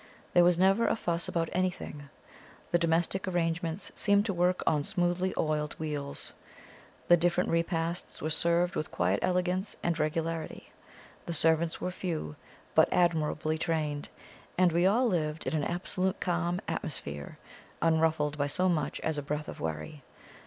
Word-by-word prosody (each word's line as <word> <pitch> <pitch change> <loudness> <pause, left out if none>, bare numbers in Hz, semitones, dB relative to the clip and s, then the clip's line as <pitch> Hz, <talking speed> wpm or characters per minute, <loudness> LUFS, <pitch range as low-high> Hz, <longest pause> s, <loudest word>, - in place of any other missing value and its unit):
There 175 - +7
was 175 -1 +4
never 195 +5 +4
a - - +2
fuss 170 -5 -2
about 165 -1 -1
anything: 180 -6 -3 0.6
the 175 - +4
domestic 170 +3 +1
arrangements 165 0 -1
seemed 200 0 +3
to 200 - -1
work 180 +1 +1
on 150 -2 +2
smoothly 175 +2 0
oiled 150 -1 0
wheels; 145 -3 -3 0.7
the 175 - +8
different 175 +1 +1
repasts 165 0 -1
were 155 - -2
served 170 +3 +2
with 155 - -2
quiet 90 +3 +1
elegance 180 +2 0
and 170 -1 0
regularity; 160 +1 -2 0.6
the 170 - -2
servants 160 +1 +2
were 180 - -2
few, 165 - -4 0.4
but - - +5
admirably 155 -2 +1
trained; 150 -3 -1 0.5
and 180 -1 +5
we 170 +3 +3
all 235 +6 +3
lived 160 -7 -1
in - - -2
an 150 - 0
absolutely 185 +3 0
calm 175 +1 0
atmosphere, 75 - -5 0.4
unruffled 160 -2 +2
by 145 - +2
so 185 +6 +2
much 170 -4 0
as 160 -2 -1
a - - -2
breath 150 +1 -3
of - - -7
worry. 80 - -4
165 Hz, 150 wpm, -30 LUFS, 155-180 Hz, 0.7 s, the